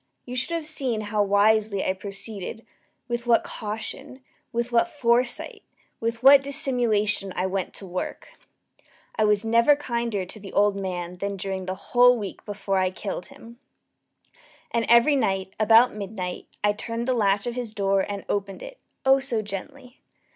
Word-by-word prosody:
You 250 - -6
should 260 +7 0
have 330 -2 -3
seen 265 -8 -1
how 210 0 -1
wisely 205 0 +2
I 185 - +1
proceeded 200 +2 -7 0.4
with 240 0 -3
what 235 -1 +4
caution 255 +5 -7 0.3
with 235 0 -2
what 235 -1 +3
foresight 240 -2 0 0.4
with 230 +1 -3
what 275 +1 +9
dissimulation 240 -9 +1
I 185 - 0
went 190 0 -3
to 195 - -8
work! 185 - -5 0.9
I 215 - +1
was 210 0 +2
never 235 +6 +5
kinder 235 -8 -2
to 200 +4 -10
the 195 -1 -10
old 205 0 +3
man 180 -2 -4
than 200 +1 -3
during 190 -1 -4
the 185 - -2
whole 245 +5 +4
week 200 -4 -7
before 200 -2 -2
I 185 0 +2
killed 185 -1 -6
him. 235 +1 -14 1.1
And 230 -1 0
every 235 +5 +6
night, 195 -6 -1
about 225 +3 +6
midnight, 195 -3 -5 0.2
I 205 0 +3
turned 230 +3 -5
the 255 - +2
latch 200 -4 +2
of 240 - -2
his 240 -3 -4
door 195 -2 +1
and 200 0 -5
opened 200 -1 -3
it - - -10 0.3
oh 270 0 +6
so 240 -5 -2
gently! 210 +5 -8
215 Hz, 165 wpm, -25 LUFS, 195-240 Hz, 1.1 s, what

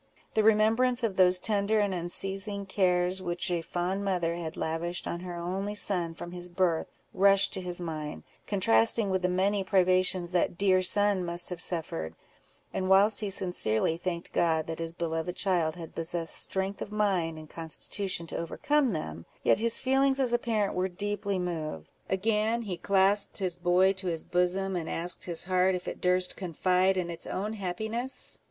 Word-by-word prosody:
The 220 - +3
remembrance 225 +4 +3
of 215 -4 0
those 185 -1 +5
tender 210 +1 +1
and 205 -2 +1
unceasing 195 +3 0
cares 185 -1 +1
which 175 0 -2
a 170 -1 0
fond 180 +4 -2
mother 180 -4 0
had 170 -1 -6
lavished 170 +2 -3
on 170 - -3
her 180 -1 -7
only 190 +4 -3
son, 175 -5 +2
from 175 - -8
his 180 0 -6
birth, 175 -2 0 0.3
rushed 195 +1 +4
to 190 - 0
his 180 -1 -2
mind, 155 -3 -5 0.2
contrasting 190 - +3
with 190 -1 0
the 180 - +1
many 195 +2 +1
privations 185 -2 +2
that 175 -1 0
dear 185 -1 +3
son 205 0 +2
must 175 +1 0
have 180 -1 -4
suffered; 155 - -2 0.6
and 185 0 -2
whilst 200 +2 +5
he 210 - -2
sincerely 170 - +2
thanked 170 0 -5
God 160 -2 +1
that 165 0 -6
his 165 0 -3
beloved 165 +1 -3
child 175 -5 0
had 165 -2 -9
possessed 165 0 -2
strength 190 +1 +1
of - - -5
mind 190 -6 0
and 155 0 -10
constitution 170 +3 -3
to - - -6
overcome 270 - 0
them, 85 - -6 0.2
yet - - +3
his 230 0 +4
feelings 270 +1 +2
as 250 -3 +2
a 240 - +3
parent 215 -4 -1
were 185 +1 -1
deeply 200 +1 -3
moved. 160 - -4 0.2
Again 220 +4 0
he 195 -5 -4
clasped 200 +2 +1
his 185 -4 -2
boy 180 +2 +3
to 190 -1 -4
his 165 -2 -2
bosom, 185 +2 0
and 165 -2 -3
asked 175 +2 -3
his 170 -3 -3
heart 185 +1 +2
if 180 - -6
it - - -6
durst 180 0 +1
confide 185 +1 +1
in 175 -2 -2
its 170 - -7
own 210 +3 -3
happiness? 220 +6 -3
185 Hz, 180 wpm, -28 LUFS, 170-200 Hz, 0.6 s, those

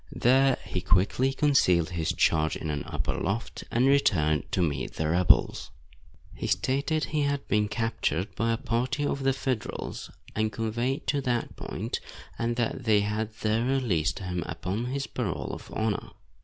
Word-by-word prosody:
There 135 +2 +4
he 90 - -3
quickly 100 +10 +2
concealed 95 - +3
his 85 -3 0
charge 80 -1 +2
in 80 - -3
an 75 -1 -3
upper - - -2
loft, 110 +6 -3
and 120 +2 +2
returned 80 - +3
to 90 - +2
meet 70 -5 -2
the 80 - -1
rebels. 85 +2 +3 0.6
He - - -4
stated 140 +4 +1
he 150 +2 -1
had 140 -1 -1
been 105 +1 +2
captured 105 -5 -1
by 115 0 0
a 115 - +1
party 125 +6 -1
of 140 -1 -1
the 135 0 +3
Federals 130 -3 -3 0.3
and 110 0 +1
conveyed 115 +5 -2
to 145 - +1
that 120 -3 -1
point, - - -4 0.4
and 120 +1 0
that 120 +1 -2
they 105 -2 +4
had 105 +1 -2
there 110 +1 +1
released 110 - +1
him 90 -2 -3
upon 90 +7 -3
his 135 +2 -2
parole 110 -9 -3
of - - -9
honor. 110 -2 -1
115 Hz, 165 wpm, -28 LUFS, 90-130 Hz, 0.6 s, There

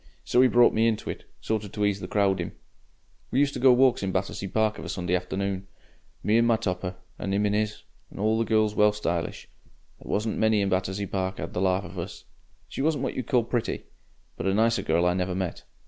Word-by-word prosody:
So 125 - +3
'e 130 - +7
brought 120 -1 +5
me 110 +1 +3
into 110 -2 -1
it, - - -10 0.2
sort 110 -1 -1
of 100 - -9
to 105 -1 0
ease 100 -1 +1
the 90 - -6
crowding. 95 -3 +1 0.8
We - - -2
used 140 0 +3
to - - -4
go 130 0 +7
walks 125 0 +4
in 95 -1 -1
Battersea 95 +1 -2
Park 110 +2 0
of - - -7
a - - -6
Sunday 90 -1 -1
afternoon. 95 +1 -2 0.6
Me 110 +2 +3
in 115 - +4
my 115 - +4
topper, 90 -2 -3 0.2
and 95 0 -2
'im 105 +1 +2
in 105 - +1
'is; 105 0 -1 0.3
and - - -13
the 110 +2 +2
girl's 110 -1 +2
well 105 0 +4
stylish. 85 -5 -3 0.5
There - - -12
wasn't 110 +1 -1
many 110 -1 +3
in 100 - +1
Battersea 95 +2 -1
Park 95 -1 -3
'ad - - -5
the 90 - -1
larf 95 0 +1
of - - -8
us. - - -7 0.4
She - - -5
wasn't 145 -2 +1
what - - -1
you'd 130 - -4
call 125 -2 +3
pretty, 120 0 -2 0.5
but - - -2
a 95 - +2
nicer 115 +2 +3
girl 85 - +1
I 90 - +3
never 90 0 -1
met. 95 -2 -4
105 Hz, 230 wpm, -26 LUFS, 95-110 Hz, 0.8 s, e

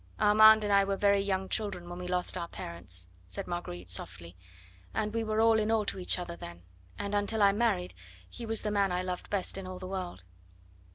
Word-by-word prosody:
"Armand 215 +1 +7
and 205 -1 +1
I 200 0 +6
were 195 0 -1
very 200 0 +3
young 190 -1 -1
children 200 -5 -2
when 175 0 -7
we 180 - -5
lost 180 0 0
our 170 -2 -3
parents," 90 - -6 0.2
said 90 - -3
Marguerite 95 - -5
softly, 85 -1 -2 0.6
"and 210 0 -1
we 230 0 0
were 215 0 -1
all 225 0 +5
in 215 0 0
all 220 -2 +2
to 195 - 0
each 180 - +3
other 175 -1 -5
then. 85 - -10 0.3
And 200 0 -4
until 205 +1 +2
I 200 - +6
married 205 -4 0 0.3
he 235 - -9
was 225 0 -1
the 210 - -1
man 200 -2 +2
I 180 +1 -1
loved 180 -1 -5
best 195 -1 -2
in 190 - -7
all 185 0 -6
the 185 - -8
world." 185 - -5
195 Hz, 220 wpm, -30 LUFS, 175-210 Hz, 0.6 s, Armand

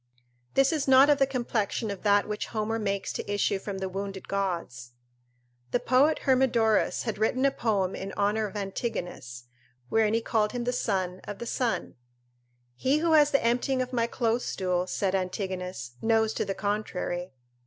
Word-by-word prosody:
This 270 +3 +4
is 300 -3 -1
not 265 +2 +7
of 290 - +3
the 270 - +4
complexion 235 -4 -1
of 200 - -6
that 205 -1 +3
which 210 0 -3
Homer 225 0 -2
makes 200 -2 -2
to - - -4
issue 205 -1 +1
from 195 0 -5
the 190 0 -3
wounded 195 0 -5
gods." 170 -12 -3 0.8
The 245 - +1
poet 270 +6 +3
Hermodorus 245 -5 +3
had 220 -3 -3
written 250 +5 +2
a 275 - +4
poem 200 -7 0
in 195 +1 -5
honour 210 +2 +1
of 205 - -12
Antigonus, 180 - -4 0.5
wherein 220 -1 +3
he 230 - +1
called 220 -1 0
him 245 -1 -2
the 245 +1 -1
son 190 -6 -1
of 205 - -6
the 235 - -6
sun: 235 - -2 0.8
"He 265 - +2
who 330 +1 +1
has 300 -2 +6
the 275 -4 +1
emptying 250 +3 +1
of 255 - -9
my 235 -1 +1
close 235 0 0
stool," 180 -1 -1
said 190 0 -1
Antigonus, 185 - -3
"knows 225 -1 +2
to - - -1
the 195 - -3
contrary." 190 -4 -3
215 Hz, 175 wpm, -28 LUFS, 190-245 Hz, 0.8 s, not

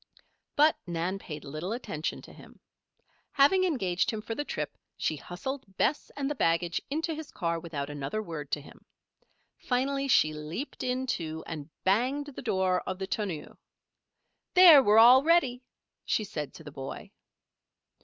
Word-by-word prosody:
But 305 +2 +5
Nan 175 +3 -2
paid 150 -5 -8
little 155 +8 -4
attention 160 -10 -4
to - - -13
him. - - -16 0.7
Having 370 +7 +5
engaged 190 - 0
him 220 - -2
for 220 +1 -5
the 290 - -3
trip - - -4 0.2
she 155 - -1
hustled 195 - -7
Bess 290 - +1
and 275 -1 -1
the 295 - -1
baggage 170 - +1
into 320 +3 -1
his 315 -1 -7
car 170 -1 -2
without 155 -4 -5
another 145 +6 -4
word 160 -8 -6
to 145 - 0
him. 145 - -16 0.8
Finally 275 +2 0
she 155 - +4
leaped 155 - -6
in, 255 +1 -1
too, 160 -9 -3
and 155 -2 -7
banged 250 +9 +1
the - - -6
door 190 -5 +1
of 185 - -3
the 190 - -3
tonneau. 190 -6 -4 1.0
"There! 345 -6 +10
we're 210 -3 +4
all 245 +3 +9
ready," 280 -6 +3 0.4
she 215 - 0
said 160 -9 -5
to 160 - -11
the 150 - -9
boy. 135 -1 -8
195 Hz, 160 wpm, -29 LUFS, 165-270 Hz, 1.0 s, There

